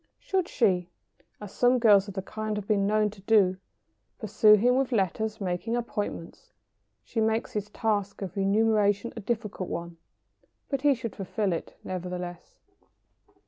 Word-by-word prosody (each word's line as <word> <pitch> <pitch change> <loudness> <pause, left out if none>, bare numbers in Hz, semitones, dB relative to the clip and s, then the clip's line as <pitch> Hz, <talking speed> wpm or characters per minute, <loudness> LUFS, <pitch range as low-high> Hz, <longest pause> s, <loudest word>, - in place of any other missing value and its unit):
Should 375 -3 -1
she, 185 -7 +1 0.5
as 210 -2 -9
some 250 +1 +3
girls 210 -4 +5
of 200 - -8
the 190 - -3
kind 215 +1 -4
have 205 -1 -5
been 200 -2 +2
known 210 0 +2
to 200 -2 -15
do, 195 -3 +3 0.6
pursue 215 0 +4
him 240 +4 +3
with 270 0 +1
letters 220 +1 -1
making 195 +4 -2
appointments, 210 -7 -5 0.5
she 225 - -2
makes 220 +1 0
his 210 0 -4
task 205 -2 -2
of 185 - -6
renunciation 205 +1 +2
a - - -5
difficult 210 -3 -3
one, 170 0 -5 0.7
but 275 -2 -1
he 285 -1 +4
should 230 -2 -6
fulfil 195 0 -2
it 165 - -6
nevertheless. 180 -1 -6
210 Hz, 150 wpm, -27 LUFS, 190-225 Hz, 0.7 s, girls